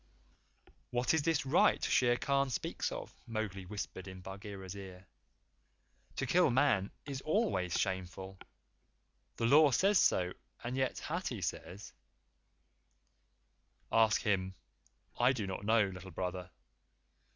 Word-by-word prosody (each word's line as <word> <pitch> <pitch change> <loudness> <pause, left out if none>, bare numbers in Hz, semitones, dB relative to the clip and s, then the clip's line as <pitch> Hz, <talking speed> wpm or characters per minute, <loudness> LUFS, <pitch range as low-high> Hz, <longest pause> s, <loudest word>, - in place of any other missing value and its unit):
"What 125 +3 +1
is 160 - +3
this 160 -2 +1
right 135 +5 +4
Shere 120 -1 +3
Khan 140 +1 +1
speaks 125 - -2
of?" - - -6
Mowgli 105 -5 -4
whispered 100 -1 -6
in 95 -1 -8
Bagheera's 95 0 -8
ear. 95 -2 -10 1.1
"To - - -1
kill 180 -3 +4
Man 120 -6 +3 0.2
is 135 -2 -5
always, 155 - 0
shameful. 95 0 -3 1.0
The 115 - -1
Law 150 +5 +7
says 195 - +4
so. 90 0 +2 0.3
And 120 +2 -3
yet 130 -1 0
Hathi 155 - -3
says 90 +4 -5 1.0
" - - -44 0.3
"Ask 110 -1 +4
him. 95 -3 0 0.6
I 125 +2 +5
do 110 -6 -3
not 95 +1 -5
know, 110 0 +4
Little 95 0 -8
Brother. 90 +1 -4
105 Hz, 125 wpm, -33 LUFS, 95-130 Hz, 1.1 s, Law